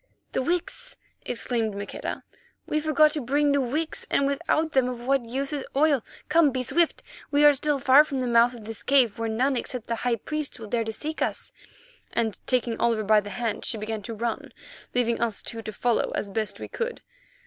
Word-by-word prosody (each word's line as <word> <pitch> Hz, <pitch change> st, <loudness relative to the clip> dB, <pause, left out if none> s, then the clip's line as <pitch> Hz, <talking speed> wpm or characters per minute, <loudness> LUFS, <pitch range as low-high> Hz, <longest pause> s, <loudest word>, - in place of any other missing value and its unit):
"The -, -, 0 dB
wicks!" 355 Hz, -, -3 dB, 0.3 s
exclaimed 230 Hz, -3 st, -1 dB
Maqueda, 200 Hz, 0 st, -5 dB, 0.4 s
"we 305 Hz, -, 0 dB
forgot 305 Hz, 0 st, +4 dB
to 300 Hz, -, -2 dB
bring 285 Hz, +4 st, +2 dB
new 280 Hz, 0 st, +3 dB
wicks, 300 Hz, +6 st, -2 dB
and 280 Hz, -, +2 dB
without 310 Hz, +2 st, 0 dB
them 260 Hz, -3 st, +2 dB
of 250 Hz, -1 st, -5 dB
what 255 Hz, -2 st, 0 dB
use 275 Hz, +4 st, -2 dB
is 285 Hz, -2 st, -2 dB
oil? 285 Hz, -4 st, +3 dB, 0.2 s
Come, 320 Hz, 0 st, +5 dB
be 255 Hz, -1 st, -2 dB
swift; 335 Hz, +6 st, +1 dB, 0.3 s
we 290 Hz, +1 st, +4 dB
are 295 Hz, -, +8 dB
still 290 Hz, +1 st, +1 dB
far 270 Hz, +2 st, +7 dB
from 280 Hz, -3 st, -4 dB
the 255 Hz, -, -1 dB
mouth 240 Hz, +1 st, +4 dB
of 225 Hz, -3 st, -11 dB
this 225 Hz, 0 st, -7 dB
cave, 250 Hz, -6 st, +3 dB
where 230 Hz, 0 st, -1 dB
none 255 Hz, +5 st, +1 dB
except 245 Hz, -1 st, -4 dB
the 230 Hz, -, -2 dB
high 245 Hz, -1 st, +1 dB
priests 305 Hz, +5 st, -4 dB
will 220 Hz, -3 st, -9 dB
dare 230 Hz, 0 st, 0 dB
to 220 Hz, -, -2 dB
seek 310 Hz, +8 st, -5 dB
us," -, -, -2 dB, 0.6 s
and, 225 Hz, -3 st, -1 dB
taking 240 Hz, -3 st, 0 dB
Oliver 230 Hz, -2 st, +2 dB
by 215 Hz, +1 st, +5 dB
the 205 Hz, 0 st, -7 dB
hand, 230 Hz, -1 st, -3 dB
she 225 Hz, -, -2 dB
began 215 Hz, 0 st, -4 dB
to 225 Hz, +3 st, -6 dB
run, 235 Hz, +5 st, -3 dB, 0.4 s
leaving 235 Hz, -2 st, +1 dB
us 230 Hz, -3 st, -1 dB
two 230 Hz, -1 st, -4 dB
to 220 Hz, -, -6 dB
follow 235 Hz, +3 st, 0 dB
as 200 Hz, -, -3 dB
best 210 Hz, -2 st, -2 dB
we -, -, -6 dB
could. 470 Hz, 0 st, -4 dB
250 Hz, 210 wpm, -26 LUFS, 225-290 Hz, 0.6 s, are